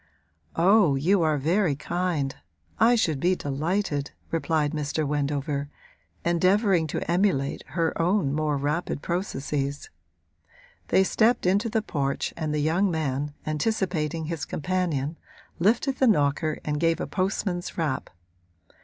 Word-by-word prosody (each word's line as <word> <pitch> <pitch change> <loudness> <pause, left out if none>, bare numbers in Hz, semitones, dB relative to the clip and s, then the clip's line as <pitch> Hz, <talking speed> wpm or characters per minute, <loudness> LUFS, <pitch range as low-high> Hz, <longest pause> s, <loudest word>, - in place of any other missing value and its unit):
'Oh, 185 -3 +5
you 175 +8 +2
are 155 -2 +2
very 165 +2 +1
kind 160 -3 -2 0.4
I 235 +2 +6
should 160 - +1
be 180 +5 +2
delighted,' 150 +1 -1 0.2
replied 160 -2 0
Mr. 150 0 -2
Wendover, 145 0 -1 0.6
endeavouring 185 0 +3
to - - -3
emulate 170 -6 +1
her 165 -2 0
own 170 -5 +2
more 150 -1 0
rapid 145 +1 -2
processes. 145 -5 -3 1.0
They 190 - +4
stepped 225 +4 +2
into 200 +5 +2
the 220 -1 0
porch 140 -7 -2
and 155 -2 -3
the 150 0 0
young 170 +6 +2
man, 145 -3 -2
anticipating 160 -2 -1
his 160 -2 -4
companion, 165 -3 -2 0.4
lifted 235 - +2
the 265 - +3
knocker 150 -5 +2
and 150 -1 -1
gave 165 0 +2
a - - -2
postman's 185 -1 -2
rap. 150 -6 -1
160 Hz, 125 wpm, -26 LUFS, 145-185 Hz, 1.0 s, I